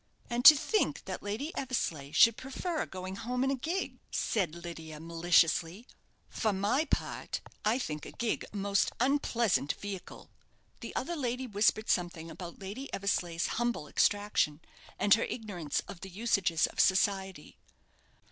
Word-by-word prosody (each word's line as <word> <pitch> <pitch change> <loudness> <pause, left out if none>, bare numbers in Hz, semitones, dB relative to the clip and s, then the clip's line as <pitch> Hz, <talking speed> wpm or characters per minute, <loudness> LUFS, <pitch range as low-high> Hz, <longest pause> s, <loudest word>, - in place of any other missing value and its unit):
"And 240 +1 0
to 300 +2 +13
think 305 +9 0
that - - -5
Lady 220 +11 -4
Eversleigh 165 - -2
should 230 +7 +6
prefer 290 +7 -3
going 185 +1 -6
home 250 +3 -2
in 270 - +2
a - - +1
gig," 330 +9 -3
said 180 -7 -1
Lydia, 165 -3 -8
maliciously; 170 +4 +2 0.4
"for 220 - 0
my 205 +10 +1
part, - - -2 0.2
I 215 +3 +2
think 155 - -4
a - - -9
gig 230 -1 -2
a 205 - -6
most 200 0 +1
unpleasant 235 - +2
vehicle." 200 -2 -8 0.5
The - - -8
other 345 - -2
lady 255 -3 -2
whispered 215 0 +2
something 170 -2 -1
about 170 +1 -8
Lady 205 +8 -7
Eversleigh's 175 -4 -1 0.2
humble 240 -11 -1
extraction, 205 -6 +1 0.4
and 200 +1 +5
her - - +4
ignorance 180 - -3
of 185 - -9
the 195 - -7
usages 190 -5 +1
of - - -8
society. 190 -3 +1
200 Hz, 145 wpm, -31 LUFS, 175-240 Hz, 0.5 s, to